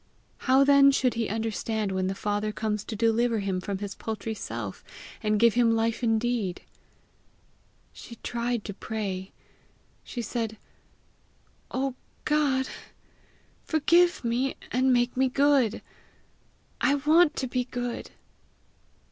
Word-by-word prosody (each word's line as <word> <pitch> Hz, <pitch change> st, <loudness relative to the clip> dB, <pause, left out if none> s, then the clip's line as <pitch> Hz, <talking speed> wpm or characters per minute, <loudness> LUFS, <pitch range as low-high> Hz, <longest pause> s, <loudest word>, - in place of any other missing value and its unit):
How 265 Hz, +1 st, +6 dB
then 280 Hz, 0 st, +7 dB
should 260 Hz, -2 st, +2 dB
he 230 Hz, -2 st, -2 dB
understand 220 Hz, -1 st, -2 dB
when 190 Hz, 0 st, -1 dB
the 190 Hz, -, -2 dB
father 205 Hz, +1 st, -1 dB
comes 210 Hz, -1 st, -2 dB
to 220 Hz, -, -5 dB
deliver 230 Hz, +1 st, +2 dB
him 195 Hz, -3 st, -2 dB
from 200 Hz, +1 st, -3 dB
his 200 Hz, 0 st, -5 dB
paltry 220 Hz, 0 st, -4 dB
self, 115 Hz, -, -6 dB, 0.4 s
and 210 Hz, -1 st, +1 dB
give 235 Hz, -1 st, +5 dB
him 230 Hz, -1 st, +3 dB
life 225 Hz, +1 st, 0 dB
indeed! 225 Hz, -4 st, 0 dB, 1.3 s
She 235 Hz, -, -11 dB
tried 235 Hz, -1 st, -2 dB
to 205 Hz, -, -5 dB
pray. 195 Hz, -3 st, -4 dB, 0.7 s
She 240 Hz, -, -5 dB
said, 225 Hz, -1 st, -3 dB, 1.1 s
"Oh 265 Hz, 0 st, -1 dB, 0.3 s
G 300 Hz, -, +1 dB
od! 270 Hz, -3 st, +2 dB, 1.0 s
forgive 345 Hz, +2 st, +3 dB
me, 245 Hz, +3 st, 0 dB, 0.2 s
and 260 Hz, +2 st, +3 dB
make 245 Hz, 0 st, +2 dB
me 260 Hz, 0 st, +2 dB
good. 275 Hz, -4 st, +2 dB, 1.0 s
I 285 Hz, -, +4 dB
want 305 Hz, +3 st, +4 dB
to 265 Hz, -, -2 dB
be 250 Hz, 0 st, -1 dB
good!" 245 Hz, -1 st, -4 dB
235 Hz, 130 wpm, -27 LUFS, 215-260 Hz, 1.3 s, then